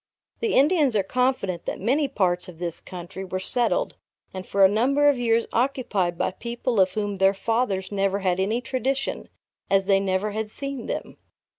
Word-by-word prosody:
The 455 Hz, -2 st, 0 dB
Indians 290 Hz, -3 st, +4 dB
are 200 Hz, -, +3 dB
confident 225 Hz, -6 st, -1 dB
that -, -, -4 dB
many 275 Hz, +9 st, +1 dB
parts 185 Hz, -8 st, 0 dB
of 180 Hz, -3 st, -11 dB
this 170 Hz, -1 st, -4 dB
country 180 Hz, +1 st, -8 dB
were 185 Hz, 0 st, -4 dB
settled 245 Hz, -, 0 dB, 0.4 s
and 185 Hz, -1 st, -7 dB
for 195 Hz, -1 st, +5 dB
a -, -, +9 dB
number 265 Hz, +8 st, +2 dB
of 285 Hz, -3 st, +3 dB
years 230 Hz, -1 st, +2 dB
occupied 225 Hz, -9 st, 0 dB
by -, -, 0 dB
people 235 Hz, +2 st, -3 dB
of 185 Hz, -1 st, +3 dB
whom 205 Hz, -1 st, -2 dB
their 195 Hz, +1 st, +4 dB
fathers 210 Hz, -3 st, -1 dB
never 195 Hz, -1 st, +1 dB
had 185 Hz, -2 st, 0 dB
any 215 Hz, +6 st, 0 dB
tradition, 265 Hz, +1 st, -2 dB, 0.4 s
as 195 Hz, 0 st, +3 dB
they 195 Hz, 0 st, +4 dB
never 195 Hz, +2 st, -1 dB
had 215 Hz, +1 st, -3 dB
seen 275 Hz, 0 st, -6 dB
them. -, -, -5 dB
205 Hz, 180 wpm, -24 LUFS, 190-255 Hz, 0.4 s, a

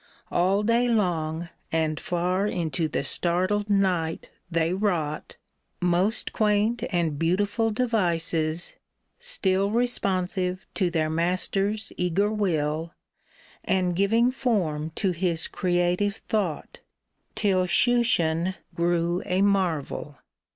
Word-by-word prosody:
All 190 Hz, +4 st, +2 dB
day 230 Hz, +3 st, +3 dB
long 170 Hz, -7 st, 0 dB, 0.2 s
And 155 Hz, -1 st, 0 dB
far 180 Hz, +3 st, 0 dB
into 170 Hz, -3 st, -1 dB
the 150 Hz, -, -2 dB
startled 185 Hz, +8 st, 0 dB
night, 185 Hz, -5 st, 0 dB, 0.2 s
they 165 Hz, 0 st, +1 dB
wrought 180 Hz, -7 st, -1 dB, 0.4 s
Most 180 Hz, +5 st, 0 dB
quaint 215 Hz, +2 st, +2 dB
and 165 Hz, -5 st, 0 dB
beautiful 205 Hz, +7 st, +1 dB
devices 170 Hz, -8 st, -1 dB, 0.2 s
— -, -, -52 dB, 0.2 s
still 200 Hz, -, +1 dB
Responsive 190 Hz, -5 st, -1 dB
to 185 Hz, -4 st, +1 dB
their 160 Hz, -2 st, 0 dB
master's 195 Hz, +5 st, 0 dB
eager 180 Hz, +4 st, +1 dB
will, 165 Hz, -5 st, -1 dB, 0.7 s
And 180 Hz, -2 st, +1 dB
giving 225 Hz, +6 st, +3 dB
form 180 Hz, -, -1 dB
to 195 Hz, -3 st, +1 dB
his 170 Hz, -1 st, -1 dB
creative 180 Hz, +2 st, 0 dB
thought 195 Hz, -8 st, -3 dB, 0.3 s
— -, -, -48 dB
Till 195 Hz, -4 st, +2 dB
Shushan 185 Hz, -6 st, +2 dB, 0.2 s
grew 170 Hz, +1 st, 0 dB
a 185 Hz, +1 st, +2 dB
marvel 170 Hz, -7 st, 0 dB
180 Hz, 110 wpm, -26 LUFS, 165-205 Hz, 0.7 s, day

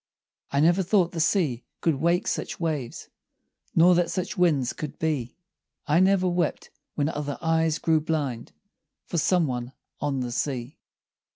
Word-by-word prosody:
I 140 Hz, -, +1 dB
never 175 Hz, +4 st, +4 dB
thought 185 Hz, -1 st, +2 dB
the 165 Hz, -, -5 dB
sea 155 Hz, -, +1 dB, 0.2 s
could 165 Hz, -, +2 dB
wake 170 Hz, +4 st, +1 dB
such -, -, -3 dB
waves, 150 Hz, -8 st, -3 dB, 0.7 s
Nor 175 Hz, +2 st, +6 dB
that 175 Hz, -1 st, +2 dB
such 180 Hz, +1 st, -3 dB
winds 150 Hz, -9 st, +2 dB
could 150 Hz, -2 st, -6 dB
be; 145 Hz, -7 st, -2 dB, 0.5 s
I 155 Hz, +2 st, +3 dB
never 185 Hz, 0 st, +4 dB
wept 175 Hz, -3 st, -1 dB, 0.2 s
when 145 Hz, -1 st, +1 dB
other 145 Hz, -2 st, -3 dB
eyes 165 Hz, -1 st, +1 dB
grew 160 Hz, -1 st, +2 dB
blind 145 Hz, -7 st, -2 dB, 0.5 s
For 170 Hz, -, -1 dB
some 180 Hz, +2 st, +3 dB
one 125 Hz, -1 st, -4 dB, 0.3 s
on 135 Hz, -3 st, -1 dB
the 125 Hz, -1 st, -3 dB
sea. 130 Hz, 0 st, -3 dB
160 Hz, 155 wpm, -26 LUFS, 140-175 Hz, 0.7 s, Nor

